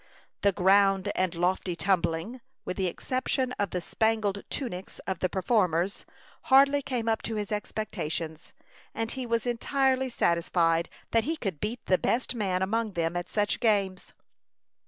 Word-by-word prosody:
The 200 Hz, -, +4 dB
"ground 195 Hz, +1 st, +4 dB
and 185 Hz, -2 st, 0 dB
lofty 180 Hz, +1 st, 0 dB
tumbling," 185 Hz, +5 st, 0 dB, 0.2 s
with 180 Hz, -, -3 dB
the 190 Hz, -1 st, 0 dB
exception 255 Hz, +6 st, -1 dB
of 205 Hz, -, +1 dB
the 180 Hz, -, -3 dB
spangled 220 Hz, 0 st, 0 dB
tunics 195 Hz, -9 st, -5 dB
of 190 Hz, -3 st, -2 dB
the 185 Hz, -, 0 dB
performers, 185 Hz, -2 st, +1 dB, 0.4 s
hardly 275 Hz, +2 st, +6 dB
came 245 Hz, -4 st, -3 dB
up 225 Hz, -1 st, +1 dB
to 225 Hz, -, -4 dB
his 210 Hz, -1 st, -3 dB
expectations; 170 Hz, -6 st, -4 dB, 0.4 s
and 225 Hz, 0 st, -2 dB
he 260 Hz, -2 st, -4 dB
was 230 Hz, 0 st, 0 dB
entirely 260 Hz, +2 st, +1 dB
satisfied 170 Hz, -4 st, +1 dB, 0.2 s
that 230 Hz, -1 st, +3 dB
he 320 Hz, +3 st, -1 dB
could 195 Hz, -, -3 dB
beat 225 Hz, +4 st, -4 dB
the 185 Hz, -, +3 dB
best 250 Hz, +2 st, 0 dB
man 190 Hz, -5 st, 0 dB
among 220 Hz, +2 st, -1 dB
them 170 Hz, 0 st, -1 dB
at 175 Hz, 0 st, -3 dB
such 205 Hz, -1 st, 0 dB
games. 200 Hz, -5 st, +1 dB
200 Hz, 155 wpm, -28 LUFS, 180-230 Hz, 0.4 s, hardly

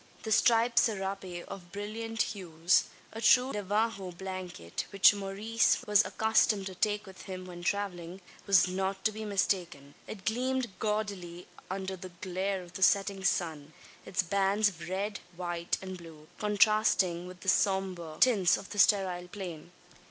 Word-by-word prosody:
The 220 Hz, -, -4 dB
striped 230 Hz, +2 st, +4 dB
serape 195 Hz, -4 st, -2 dB
of 180 Hz, -3 st, -9 dB
brilliant 225 Hz, +2 st, -3 dB
hues 175 Hz, -3 st, +1 dB, 0.3 s
a 225 Hz, -, -6 dB
true 250 Hz, +3 st, +5 dB
Navajo 205 Hz, -1 st, -1 dB
blanket, 180 Hz, -, -6 dB
which 200 Hz, +1 st, +6 dB
Maurice 205 Hz, +3 st, 0 dB
was 210 Hz, 0 st, +5 dB
accustomed 220 Hz, -2 st, +2 dB
to 190 Hz, -, -5 dB
take 210 Hz, +3 st, 0 dB
with 190 Hz, -3 st, -12 dB
him 185 Hz, -1 st, -6 dB
when 175 Hz, -1 st, -9 dB
travelling 185 Hz, -2 st, -3 dB, 0.3 s
was 195 Hz, -2 st, +5 dB
not 190 Hz, +1 st, -3 dB
to 215 Hz, -, +4 dB
be 215 Hz, +1 st, -6 dB
mistaken. 180 Hz, -8 st, -1 dB
It 195 Hz, -3 st, -9 dB
gleamed 250 Hz, +1 st, -1 dB
gaudily 200 Hz, -5 st, -3 dB, 0.2 s
under 190 Hz, 0 st, -3 dB
the 185 Hz, 0 st, -9 dB
glare 185 Hz, +2 st, -3 dB
of 175 Hz, 0 st, -15 dB
the 190 Hz, -, -7 dB
setting 195 Hz, 0 st, +3 dB
sun 160 Hz, -6 st, -1 dB, 0.3 s
its 190 Hz, 0 st, -1 dB
bands 200 Hz, +3 st, +2 dB
of 170 Hz, -3 st, -10 dB
red, 200 Hz, +2 st, -2 dB, 0.2 s
white, 175 Hz, -1 st, -2 dB
and 185 Hz, -1 st, -7 dB
blue, 160 Hz, -2 st, -13 dB
contrasting 210 Hz, -4 st, +2 dB
with 180 Hz, -1 st, -11 dB
the 190 Hz, -, -1 dB
sombre 185 Hz, -5 st, 0 dB
tints 205 Hz, -9 st, +5 dB
of 195 Hz, -, -10 dB
the 205 Hz, -, -5 dB
sterile 185 Hz, -3 st, +3 dB
plain. 175 Hz, -4 st, -8 dB
190 Hz, 150 wpm, -30 LUFS, 180-210 Hz, 0.3 s, which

